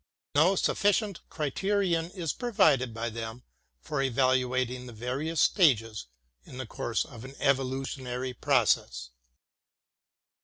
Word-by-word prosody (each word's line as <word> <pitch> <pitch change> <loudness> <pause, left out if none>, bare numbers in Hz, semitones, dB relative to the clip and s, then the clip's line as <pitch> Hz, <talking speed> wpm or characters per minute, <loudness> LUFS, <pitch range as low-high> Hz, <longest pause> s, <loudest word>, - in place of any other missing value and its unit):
No 165 +7 +4
sufficient 205 0 +1
criterion 170 +2 0
is 170 -5 -3
provided 140 - +2
by 115 +1 -4
them 115 +2 -6 0.4
for 135 - -3
evaluating 130 -1 +1
the 120 - -9
HEGEL - - -14
5 - - -16
various 140 +7 -1
stages 115 - +3 0.4
in 125 - -12
the 130 - -4
course 115 0 -2
of 115 -1 -11
an 135 +1 -10
evolutionary 130 -1 -1
process. - - +1
130 Hz, 120 wpm, -29 LUFS, 120-160 Hz, 0.4 s, No